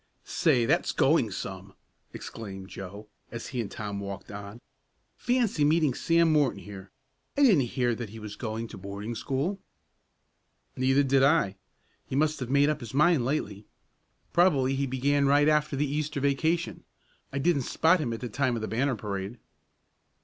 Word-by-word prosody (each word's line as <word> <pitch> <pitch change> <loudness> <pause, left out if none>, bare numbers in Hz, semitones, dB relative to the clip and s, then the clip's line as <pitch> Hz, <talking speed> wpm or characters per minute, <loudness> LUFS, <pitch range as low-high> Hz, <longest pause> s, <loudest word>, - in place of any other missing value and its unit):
"Say, 130 -8 +2
that's - - +1
going - - +3
some!" - - -7 0.4
exclaimed 95 -3 -8
Joe, 100 +3 -9 0.2
as 115 0 -6
he 125 -2 -2
and 105 - -5
Tom 100 -1 -5
walked 100 0 -7
on. 100 +2 -8 0.6
"Fancy 240 -10 +1
meeting 155 -2 +3
Sam 165 +4 +3
Morton 140 -10 +2
here. 100 -1 -10 0.5
I 285 - +4
didn't 180 - +5
hear 120 -2 +2
that 115 -1 -5
he 110 - -10
was 105 -2 -7
going 115 0 -4
to - - -9
boarding 100 +4 -6
school." 145 - -2 1.2
"Neither 135 +2 +3
did 135 0 +3
I. 135 -9 +3 0.5
He - - -4
must 155 +2 +1
have 125 -2 -4
made 140 +1 +4
up 150 0 0
his 120 -2 -8
mind 150 -3 +4
lately. 105 -7 -3 0.7
Probably 145 -7 +3
he 135 0 -1
began 140 +2 +1
right 145 +1 +4
after 150 -1 +2
the 145 +2 +1
Easter 150 +1 -2
vacation. 155 +5 0 0.5
I 140 - -4
didn't 145 +1 +2
spot 165 +7 +3
him 125 -6 -2
at 115 - -5
the 125 - -3
time 130 +2 0
of 115 - -4
the - - -2
banner 130 +4 0
parade." 100 +1 -5
130 Hz, 170 wpm, -28 LUFS, 110-150 Hz, 1.2 s, didn't